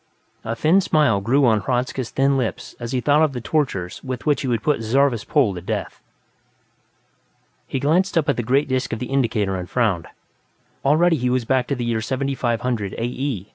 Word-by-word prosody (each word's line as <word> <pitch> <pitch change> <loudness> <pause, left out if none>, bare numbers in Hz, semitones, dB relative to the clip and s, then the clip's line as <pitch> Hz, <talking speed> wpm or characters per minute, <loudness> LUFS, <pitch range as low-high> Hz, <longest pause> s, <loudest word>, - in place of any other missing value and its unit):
A 115 +1 -3
slow 160 +10 +3
smile 150 - +2
grew 130 +7 +3
on 110 -3 +3
Hradzka's 125 +2 -2
thin 135 +1 +2
lips 125 -4 -3
as 120 0 -5
he 130 -2 0
thought 145 +3 +3
of 155 -3 +2
the 125 - -4
tortures 110 - -2
with 130 -2 -5
which 145 -3 +2
he 135 - -3
would 115 -3 -1
put 150 -6 +1
Zarvas 125 +1 +2
Pol 130 -10 +2
to 90 - -7
death. 90 - -4 1.7
He 135 - -2
glanced 170 +7 +1
up 155 - +2
at - - +2
the - - -1
great 135 +5 +1
disc 130 -2 -1
of - - -2
the 125 +3 -6
indicator 110 -7 0
and 90 -1 -5
frowned. 105 -9 0 0.8
Already 160 +4 +3
he 125 -1 0
was 125 -1 0
back 130 0 +1
to 140 - -1
the 120 -2 -3
year 115 -1 -1
7500, 125 -4 -2
A.E. 120 -3 -3
125 Hz, 195 wpm, -21 LUFS, 115-140 Hz, 1.7 s, slow